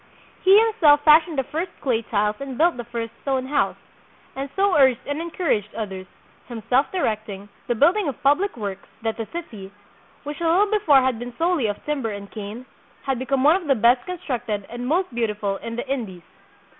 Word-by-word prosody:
He 385 +2 +7
him 450 0 +4
self 290 -2 +6
fashioned 315 +1 +5
the 270 - +1
first 325 +8 -4
clay 240 -4 0
tiles 210 -1 -1
and 270 -3 -6
built 340 +3 +3
the 240 - -6
first 230 -1 -5
stone 265 -2 -1
house, 285 +3 0 0.6
and 275 +1 -4
so 395 -1 +2
urged 265 -4 +4
and 285 +2 -3
encouraged 320 - -2
others, 190 -4 -5 0.4
himself 245 +3 0
direct 220 - -1
ing, 200 +1 -8 0.2
the 240 - 0
building 345 - +3
of 275 - -4
public 290 +6 +2
works, 200 -3 -6 0.2
that 225 -1 -1
the 225 -2 -4
city, 215 - -8 0.5
which 295 +3 -7
a - - -1
little 400 +5 +3
before 320 -11 +4
had 255 -3 0
been 245 0 -8
solely 330 -7 +1
of 205 -1 -5
timber 280 -6 -2
and 200 -1 -8
cane, 215 +3 -7 0.4
had 270 -3 -1
be 260 - -5
come 270 -1 +1
gne 305 +4 +6
of 355 -5 -8
the 275 - +4
best 240 +2 +4
constructed 245 - -4
and 240 +1 -5
most 345 0 0
beautiful 210 -4 -1
in 230 +2 -7
the 240 - -5
Indies. 220 -10 -4
260 Hz, 200 wpm, -23 LUFS, 220-310 Hz, 0.6 s, He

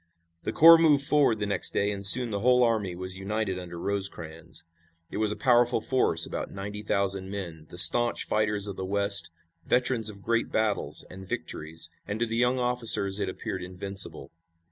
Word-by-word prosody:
The - - -5
corps 165 +1 +7
moved 150 -4 +3
forward 140 -5 +2
the 105 - -4
next 100 -2 -1
day, 100 +1 0
and 100 -1 -7
soon 115 +4 +8
the 100 - -3
whole 125 +3 +2
army 110 -6 -2
was 95 +1 -7
united 100 -1 -4
under 85 -1 -10
Rosecrans. 85 -5 -5 0.5
It - - -6
was 105 -1 0
a - - -4
powerful 120 -2 +1
force, 110 -10 0
about - - -6
ninety 100 +2 -8
thousand 100 -2 -3
men, 85 -6 -8
the 85 - -12
staunch 120 +8 +5
fighters 105 -1 -2
of 100 -2 -8
the 95 - -6
West, 100 0 +2 0.3
veterans 125 -3 -1
of 100 -2 -11
great 115 0 -2
battles 110 -2 -2
and 95 0 -12
victories, 80 +2 -5 0.2
and 100 +1 -5
to 120 - 0
the 115 0 -5
young 125 +2 +1
officers 115 -5 +2
it 100 - -3
appeared 95 0 -7
invincible. 95 -5 -5
100 Hz, 185 wpm, -25 LUFS, 95-115 Hz, 0.5 s, soon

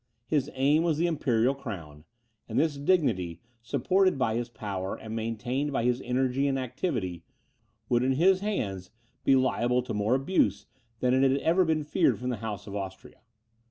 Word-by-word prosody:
His 140 +2 0
aim 140 +4 +3
was 165 -3 +1
the 170 - +2
imperial 130 -7 +2
crown; 85 - -8 0.4
and - - -3
this 155 -1 +2
dignity, 130 - +1 0.2
supported 180 +9 +2
by 125 -4 +1
his 120 +1 -2
power, 100 -4 -4
and 110 0 -7
maintained 120 +6 -2
by 130 - 0
his 125 +1 +1
energy 130 +2 0
and 135 -1 0
activity, 120 - -3 0.6
would 120 -1 +2
in 130 +1 +2
his 185 +7 +4
hands 100 - -3 0.3
be 135 - +5
liable 125 -1 +2
to 125 - -5
more 105 +4 +1
abuse 135 - +1 0.4
than 125 +1 +3
had 135 -1 +4
ever 170 +6 +3
been 160 -2 +1
feared 145 - +2
from 125 +1 -4
the 125 - -2
House 105 -1 -5
of 100 -2 -7
Austria. 95 -1 -7
125 Hz, 170 wpm, -28 LUFS, 110-145 Hz, 0.6 s, be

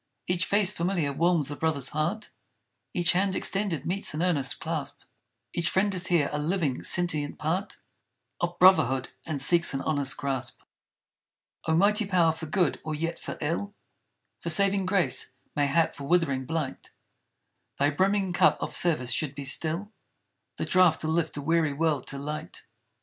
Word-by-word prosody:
Each 180 0 +1
face 200 -1 +4
familiar 170 -6 -1
warms 165 -1 +1
the 145 - -5
brother's 145 -4 0
heart; 170 +8 -2 0.6
Each 175 -1 +2
hand 190 +1 +1
extended 195 -7 0
meets 185 -3 -1
an 160 - -1
earnest 145 -7 +1
clasp; 160 -4 -4 0.5
Each 170 0 0
friend 200 +1 +1
is 185 -1 -2
here, 170 -5 +2
a 150 - -1
living 155 -4 -1
sentient 155 -5 -1
part 180 +7 -2 0.6
Of 175 0 -2
Brotherhood 135 -9 +4 0.2
and 155 -3 -3
seeks 170 +2 +3
an 135 - -2
honest 145 -3 0
grasp! 135 -3 -3 1.1
O 160 - +2
mighty 210 +3 +3
power 175 -4 +3
for 160 0 -7
good 175 +1 0
or 155 0 -3
yet 165 +2 -3
for - - -7
ill; 170 +7 -2 0.6
For 170 - -4
saving 195 +2 +3
grace; 160 -10 0 0.2
mayhap 145 +3 +2
for 140 - -8
withering 140 -5 +1
blight! 160 -4 -4 0.9
Thy 145 +1 +2
brimming 190 +3 +1
cup - - +4
of - - -4
service 150 -8 +2
should 145 +3 0
be 140 0 -6
still 165 +9 -1 0.7
The - - -2
draught 180 -3 +4
to 155 - -3
lift 160 -2 -1
a 145 - -4
weary 160 -1 +1
world 150 -2 -1
to 140 - -3
light. 150 +2 -6
165 Hz, 160 wpm, -27 LUFS, 145-180 Hz, 1.1 s, face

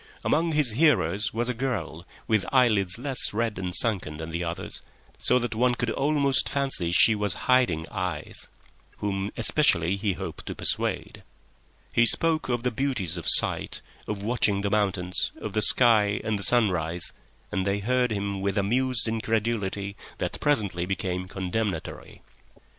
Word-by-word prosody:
Among 165 +1 +1
his 150 -6 +5
hearers 105 - +2
was 120 +2 -2
a 125 - -1
girl, 100 -9 -4 0.2
with 110 -3 +2
eyelids 110 -8 +3
less 130 0 +1
red 110 -2 -1
and 90 -1 -3
sunken 95 -10 +1
than 80 +1 -7
the 85 +2 -3
others, 85 0 -4 0.4
so 125 - +3
that 120 -2 -2
one 120 +2 +2
could 120 -1 -2
almost 140 0 +1
fancy 135 -12 0
she 110 +5 +6
was 105 -3 0
hiding 125 -12 +2
eyes, 90 -4 -4 0.5
whom 100 -1 -2
especially 95 - +2
he 100 0 -1
hoped - - -8
to - - -5
persuade. - - -2 0.7
He 120 0 +4
spoke 160 +2 +3
of 120 -1 -1
the 125 - 0
beauties 125 - -2
of 85 - -6
sight, - - +3 0.3
of 100 -2 -4
watching 105 -3 +1
the 100 0 -2
mountains, 95 -3 0
of - - -6
the 110 - +1
sky 105 -2 +4
and 110 -2 -1
the - - -6
sunrise, 90 -7 +1 0.4
and 95 -2 -1
they 100 +1 0
heard 125 +4 +1
him 100 -2 -3
with 100 +1 -1
amused 120 +4 +1
incredulity 110 -3 -2 0.2
that - - -3
presently 100 - 0
became 90 -1 -3
condemnatory. 95 -1 -4
105 Hz, 155 wpm, -26 LUFS, 95-125 Hz, 0.7 s, she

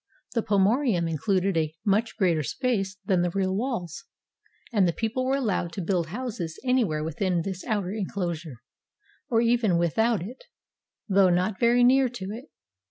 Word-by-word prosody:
The 230 - +1
pomoerium 205 - +2
included 185 +4 0
a 155 -1 0
much 215 +3 +1
greater 170 -5 +2
space 205 - -2
than 185 -2 +2
the 175 - +1
real 190 +1 -1
walls, 215 - -3 0.7
and 200 -4 +4
the 170 - 0
people 230 +5 -2
were 270 - +2
allowed 205 -10 -1
to 190 - -4
build 175 -2 0
houses 200 -5 -5
anywhere 230 -12 +1
within 170 +2 -1
this 190 -1 -5
outer 205 -4 -1
inclosure, 175 - -4 0.7
or 230 -1 +3
even 230 -6 +2
with 170 +2 0
out 225 -5 +2
it, 240 +8 -10 0.6
though 195 -2 +4
not 185 +3 0
very 240 +1 +4
near 260 +1 +5
to 200 -5 -6
it. 235 +5 -7
195 Hz, 165 wpm, -26 LUFS, 175-230 Hz, 0.7 s, near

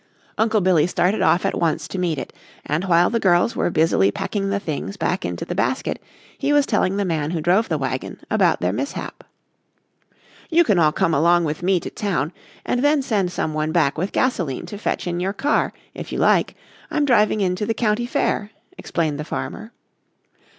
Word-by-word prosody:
Uncle 220 -1 +2
Billy 175 -4 +3
started 180 +3 +1
off 175 - +3
at - - -1
once 165 -2 0
to 190 - -5
meet 170 -4 0
it 130 - -6 0.3
and 155 +5 -1
while 175 0 +4
the 230 - +1
girls 185 +2 +3
were - - +1
busily 155 - +3
packing 195 - -2
the 200 0 0
things 195 +2 -5
back 180 +2 -1
into - - -4
the - - -4
basket - - -1 0.3
he 280 +1 -1
was 290 -1 +4
telling 195 -6 +1
the 200 - 0
man 155 -4 -1
who 170 0 -2
drove 185 +8 +2
the 160 - 0
wagon 130 -2 -4
about - - +2
their 90 +1 0
mishap. 130 +6 -5 1.3
"You 340 0 +5
can 205 - +2
all 155 -2 +4
come 180 -1 +1
along 170 +3 +4
with 155 0 -3
me 185 0 +2
to - - -6
town 175 - -2 0.3
and 245 +1 0
then 290 -1 +3
send 200 -8 0
some 160 -3 -2
one 155 0 -1
back 155 -5 +2
with 185 +5 -2
gasoline 175 - -1
to 205 - -8
fetch - - -2
in 175 -1 -2
your 190 +2 -1
car, 285 +8 +1 0.2
if - - -8
you - - -3
like. - - +2 0.3
I'm 300 -2 +1
driving 215 -5 +3
in 185 -2 +1
to 210 - -2
the 225 - 0
county 230 +1 0
fair," 210 -3 -1 0.3
explained 155 -4 -2
the - - -2
farmer. 215 +7 -6
180 Hz, 200 wpm, -21 LUFS, 160-210 Hz, 1.3 s, You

